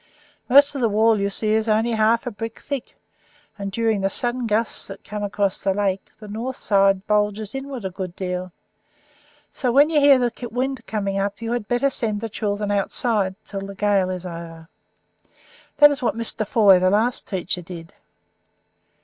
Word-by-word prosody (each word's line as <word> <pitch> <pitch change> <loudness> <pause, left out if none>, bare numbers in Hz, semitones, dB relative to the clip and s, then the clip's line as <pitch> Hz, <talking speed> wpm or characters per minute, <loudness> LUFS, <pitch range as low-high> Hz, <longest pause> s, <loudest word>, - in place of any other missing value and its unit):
Most 280 +3 +6
of 275 - -4
the 230 - +3
wall, 220 +1 +3
you 200 0 0
see, 215 +2 -1
is 220 +1 +1
only 220 +2 +2
half 225 +1 +2
a 245 - -3
brick 225 +1 -6
thick, 280 -4 -6 0.6
and, 200 -1 -5
during 225 -1 0
the 195 - +1
sudden 240 +3 -2
gusts 220 +1 -1
that 195 0 -10
come 210 0 -6
across 200 -1 -1
the 195 -1 +1
lake, 195 -2 -1
the 215 - -10
north 230 +5 -4
side 195 -3 +2
bulges 210 0 0
inward 270 -4 -6
a 190 - -3
good 185 -1 -6
deal; 180 -1 -4 1.0
so, 250 -3 -1
when 285 +5 +5
you 305 - +4
hear 285 -1 +7
the 245 -2 0 0.2
wind 260 +3 -3
coming 200 -2 -2 0.2
you 230 +1 -5
had 240 -3 -2
better 245 +4 +1
send 215 -5 -1
the 225 +1 -5
children 205 -1 -2
outside 200 -1 0
until 195 -1 -6
the 200 - -9
gale 200 -2 +1
is 185 -1 -5
over. 165 -1 -8 1.1
That 295 0 +8
is 285 0 -3
what 235 - -1
Mr. 225 -2 -1
Foy, 200 -5 +5
the 185 0 +3
last 220 +5 0
teacher 180 -2 -2
did. 165 -1 -10
210 Hz, 185 wpm, -22 LUFS, 195-235 Hz, 1.1 s, That